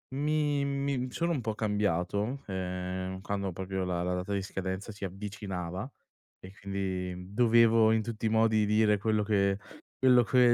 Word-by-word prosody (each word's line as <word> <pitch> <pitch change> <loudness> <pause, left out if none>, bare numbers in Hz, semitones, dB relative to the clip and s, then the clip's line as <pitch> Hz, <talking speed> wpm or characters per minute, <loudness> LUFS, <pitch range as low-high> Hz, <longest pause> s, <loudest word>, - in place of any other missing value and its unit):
Mi 145 -1 +1
mi 140 -2 -1
sono 170 +6 -1
un 135 - -1
po' 110 -1 -2
cambiato, 105 +3 -1
ehm, 95 0 -4
quando 100 -1 -2
proprio 95 +2 -3
la 90 -1 -1
la 90 +1 -1
data 90 +3 -3
di 100 - 0
scadenza 95 +2 -4
si 100 -1 -6
avvicinava 95 -1 -5 0.5
e 95 - -11
quindi, 95 -1 -4
dovevo 115 -1 +5
in 110 0 +3
tutti 115 0 -5
i - - +3
modi 110 -1 +3
dire 105 0 +3
quello 110 +1 +1
che 100 -1 +2 0.4
quello 125 -2 +6
che 120 +1 +5
105 Hz, 160 wpm, -30 LUFS, 95-115 Hz, 0.5 s, quello